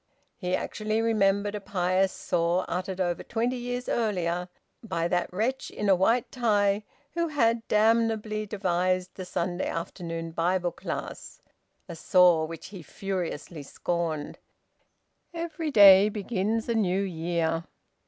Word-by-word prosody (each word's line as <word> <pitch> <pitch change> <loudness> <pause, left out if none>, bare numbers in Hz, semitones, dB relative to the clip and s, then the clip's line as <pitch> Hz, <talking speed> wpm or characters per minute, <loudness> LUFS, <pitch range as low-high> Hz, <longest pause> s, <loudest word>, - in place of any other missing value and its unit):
He 180 -1 -1
actually 215 +1 -2
remembered 205 -2 +2
a 210 - -4
pious 185 0 +1
saw 175 +1 0
uttered 185 +1 -3
over 175 -2 0
twenty 240 +2 -1
years 245 0 -4
earlier 180 -5 -1 0.3
by 170 -7 -2
that 175 0 -1
wretch 230 +8 -1
in 210 - -2
a 190 - +7
white 225 +6 +2
tie 210 -4 +2 0.3
who 340 0 0
had 230 -7 +1
damnably 215 -1 +2
devised 185 -2 0
the 185 - -7
Saturday 175 0 -2
afternoon 165 -1 -5
Bible 175 +2 0
class, - - -6 0.5
a 170 - -7
saw 175 -1 +4
which 165 +2 -8
he 190 -3 -9
furiously 175 -3 -5
scorned 160 +1 -3 1.0
"Every 330 -1 -3
day 200 -4 +8
begins 215 +1 -2
a 235 - +1
New 195 -4 +1
Year." 165 -2 -1
190 Hz, 130 wpm, -27 LUFS, 175-220 Hz, 1.0 s, day